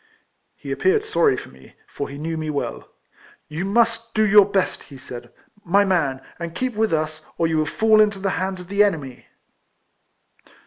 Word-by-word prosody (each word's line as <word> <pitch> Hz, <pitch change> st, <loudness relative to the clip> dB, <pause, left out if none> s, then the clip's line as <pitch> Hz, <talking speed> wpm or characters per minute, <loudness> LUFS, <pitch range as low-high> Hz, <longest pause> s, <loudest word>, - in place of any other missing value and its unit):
He -, -, -8 dB
appeared 420 Hz, +3 st, +2 dB
sorry 435 Hz, 0 st, +2 dB
for -, -, -8 dB
me, -, -, -18 dB
for 140 Hz, -, -6 dB
he 140 Hz, -, -8 dB
knew 160 Hz, +2 st, -3 dB
me 155 Hz, -1 st, -3 dB
well. 145 Hz, -2 st, -4 dB, 0.3 s
" -, -, -27 dB
You 175 Hz, +4 st, -2 dB
must 230 Hz, +2 st, +1 dB
do 215 Hz, -1 st, +4 dB
your 205 Hz, -1 st, +7 dB
best," 195 Hz, -2 st, 0 dB
he 140 Hz, -, -11 dB
said, 125 Hz, -2 st, -10 dB, 0.2 s
" -, -, -46 dB
my 200 Hz, +4 st, +3 dB
man, 145 Hz, -9 st, 0 dB, 0.2 s
and 170 Hz, 0 st, -6 dB
keep 255 Hz, +4 st, -2 dB
with 220 Hz, 0 st, +1 dB
us, 155 Hz, -1 st, -2 dB
or 165 Hz, -, +1 dB
you 160 Hz, -1 st, +1 dB
will 155 Hz, -, 0 dB
fall 220 Hz, +3 st, +4 dB
into 210 Hz, -1 st, +2 dB
the 195 Hz, 0 st, -1 dB
hands 190 Hz, 0 st, -2 dB
of 180 Hz, -, -10 dB
the 200 Hz, +2 st, +3 dB
enemy." 150 Hz, -11 st, -3 dB
190 Hz, 195 wpm, -22 LUFS, 155-215 Hz, 0.3 s, your